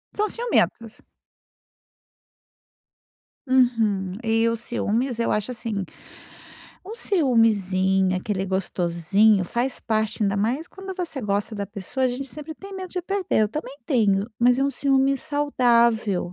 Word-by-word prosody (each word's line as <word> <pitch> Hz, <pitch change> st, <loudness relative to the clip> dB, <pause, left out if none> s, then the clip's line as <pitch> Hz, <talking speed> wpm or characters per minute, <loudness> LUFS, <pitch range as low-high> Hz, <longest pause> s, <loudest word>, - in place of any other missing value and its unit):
São 425 Hz, +1 st, +1 dB
ciumentas. 345 Hz, -, -1 dB, 2.4 s
Uhum. 225 Hz, -7 st, +1 dB
E 225 Hz, 0 st, +2 dB
o 230 Hz, -, +1 dB
ciúmes, 235 Hz, +1 st, -2 dB
eu 230 Hz, -, 0 dB
acho 210 Hz, +4 st, 0 dB
assim, 225 Hz, -4 st, -3 dB, 1.0 s
um 435 Hz, -, -6 dB
ciumezinho, 200 Hz, -, +2 dB
aquele 190 Hz, 0 st, -2 dB
gostosinho, 190 Hz, +2 st, +2 dB
faz 245 Hz, +7 st, -2 dB
parte, 220 Hz, -1 st, -1 dB
ainda 200 Hz, -1 st, +1 dB
mais 255 Hz, +11 st, -1 dB
quando 385 Hz, 0 st, -9 dB
você 340 Hz, -7 st, -4 dB
gosta 205 Hz, +1 st, -2 dB
da 200 Hz, -1 st, -4 dB
pessoa, 210 Hz, +6 st, -3 dB
a -, -, +1 dB
gente 250 Hz, +3 st, -4 dB
sempre 300 Hz, +5 st, -8 dB
tem 395 Hz, +2 st, -11 dB
medo 375 Hz, -1 st, -6 dB
de 360 Hz, -1 st, -4 dB
perder, 385 Hz, -, 0 dB
eu 210 Hz, -, +1 dB
também 280 Hz, +1 st, -6 dB
tenho, 205 Hz, -7 st, +2 dB
mas 245 Hz, +1 st, +4 dB
é 270 Hz, -, +2 dB
um 280 Hz, -, +1 dB
ciúme 275 Hz, 0 st, +2 dB
saudável, 235 Hz, -, +1 dB
230 Hz, 135 wpm, -23 LUFS, 200-275 Hz, 2.4 s, mas